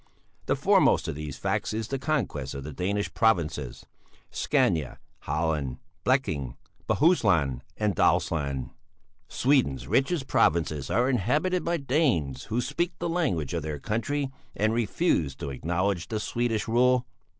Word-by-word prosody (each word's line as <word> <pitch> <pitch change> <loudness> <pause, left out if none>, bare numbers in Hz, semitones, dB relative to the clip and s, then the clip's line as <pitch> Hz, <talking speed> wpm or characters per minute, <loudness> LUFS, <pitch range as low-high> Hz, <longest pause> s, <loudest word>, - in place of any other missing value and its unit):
The - - +2
foremost - - +3
of - - -2
these 75 -2 -6
facts - - -1
is 110 0 -2
the 135 - -2
conquest 110 - -2
of 70 - -5
the 75 +1 -7
Danish 100 +6 -2
provinces: 85 - 0 0.5
Scania, 75 -7 +1 0.3
Halland, 75 -3 -1 0.3
Bleking, 80 - 0 0.3
Bohuslän, 90 - +3 0.2
and 105 -3 0
Dalsland; 70 -7 +1 0.6
Sweden's 120 - +1
richest 135 - +1
provinces 75 - +1
are 120 +3 +2
inhabited 145 - +1
by 170 0 0
Danes 130 - 0
who 115 +3 -1
still - - -4
speak 175 0 -1
the 170 - -2
language 135 - 0
of 85 - -1
their 75 0 -4
country 130 - -2 0.2
and 110 +2 +1
refuse 105 - +1
to 70 - -5
acknowledge 85 +5 -1
the 110 - -2
Swedish 115 0 -1
rule." 125 +2 +3
100 Hz, 140 wpm, -27 LUFS, -, 0.6 s, foremost